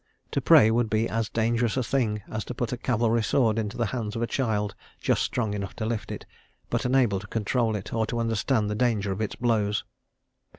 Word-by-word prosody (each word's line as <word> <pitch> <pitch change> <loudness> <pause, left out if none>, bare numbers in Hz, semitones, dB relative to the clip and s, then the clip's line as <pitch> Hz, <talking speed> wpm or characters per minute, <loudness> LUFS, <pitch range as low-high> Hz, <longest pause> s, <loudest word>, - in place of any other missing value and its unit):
To - - 0
pray 110 +1 +7
would 115 0 +1
be 110 +1 +1
as 115 -1 -1
dangerous 115 +1 +1
a 130 - +1
thing 110 -5 0
as 110 -1 -4
to 125 - -6
put 120 -1 -2
a - - -3
cavalry 115 -2 +1
sword 110 0 +2
into 105 -2 -3
the 120 - +1
hands 115 -3 -3
of 115 - -1
a - - +3
child 110 -5 -1 0.3
just - - +1
strong 110 -4 -1
enough 100 -2 -4
to 110 - -3
lift 115 -1 -3
it, - - -6 0.5
but - - 0
unable 125 -6 +3
to 105 - -10
control 110 +1 0
it, 105 0 -5
or 110 -1 0
to 120 - -3
understand 115 0 +1
the 105 - -1
danger 105 -3 +1
of 95 +3 -3
its 110 - -2
blows. 105 -4 +1
110 Hz, 220 wpm, -26 LUFS, 105-120 Hz, 0.5 s, pray